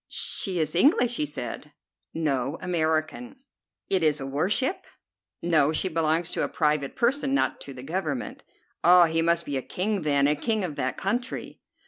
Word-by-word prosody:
"She 190 -3 -2
is 155 -2 0
English," 245 - +3
he 300 - 0
said. - - -7 0.4
"No, 140 -2 -1
American." 170 - -1 0.5
"It 190 -3 +1
is 150 -1 +2
a 135 - -5
war 145 +7 -1
ship?" 265 - 0 0.6
"No, 155 -4 +3
she 185 +4 0
belongs 165 +1 +1
to - - -1
a - - 0
private 150 -3 0
person, 270 +2 +1
not - - 0
to 140 - -8
the 125 - -9
Government." 155 -3 -3 0.4
"Ah, 175 0 +7
he 165 0 0
must 170 0 +1
be 140 -2 -2
a - - -2
king, 200 +7 -2
then, 140 -2 +2
a 150 +1 +3
king 215 +7 -1
of 160 -5 -4
that 130 -1 -2
country." 240 +6 -3
165 Hz, 175 wpm, -26 LUFS, 150-195 Hz, 0.6 s, Ah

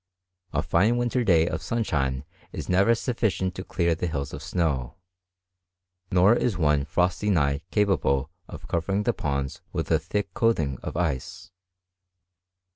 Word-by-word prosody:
A 75 +1 0
fine 105 +8 +2
winter 120 +1 0
day 85 -6 +4
of 80 -1 -3
sunshine 70 - -1 0.3
is - - -6
never 100 +5 +4
suffi 115 0 0
cient 95 -1 -2
to 95 - -6
clear 85 -3 0
the 85 +2 -2
hills 70 -4 -3
of - - -6
snow; 70 -8 -1 1.2
nor 95 +4 +5
is 120 -4 0
one 75 -4 +2
frosty 90 +6 0
night 70 -6 +2
capable 85 -9 +1 0.2
of - - -10
covering 95 +5 0
the 120 - +1
ponds 70 -5 -3
with - - -3
a 80 - +4
thick 100 +6 -3
coat 115 0 +2
ing 70 -5 -2
of - - -5
ice. 80 -1 -3
85 Hz, 155 wpm, -26 LUFS, 75-105 Hz, 1.2 s, nor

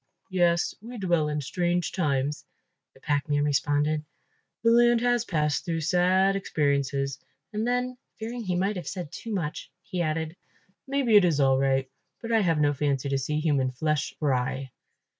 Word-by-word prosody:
"Yes, 175 -2 +2
we 240 +3 -8
dwell 175 -6 +1
in 150 0 -2
strange 175 +5 -1
times," 145 -4 -1 0.5
the - - -18
packman 145 0 0
responded, 145 +1 +1 0.6
"the 230 - +5
land 240 0 +5
has 245 -1 +2
passed 150 -7 0
through 165 -2 -2
sad 185 +3 +3
experiences," 140 -6 0 0.3
and 215 +2 -1
then, 250 0 -1 0.2
fearing 235 +2 -5
he 185 -3 -1
might 195 +3 0
have 175 - -6
said 175 -6 -5
too 230 - -7
much, 170 -7 -3
he 180 -1 -3
added, 160 0 -2 0.5
"Maybe 265 -6 +4
it 205 - +6
is 165 -5 +2
all 135 -1 +4
right, 135 -1 +1 0.3
but 230 - -5
I 225 - +4
have 165 -5 +2
no 145 -1 +3
fancy 140 -1 -1
to 135 - +1
see 150 +3 -1
human 145 -5 +1
flesh 150 +3 -1
fry." 130 -2 -1
160 Hz, 165 wpm, -27 LUFS, 145-195 Hz, 0.6 s, it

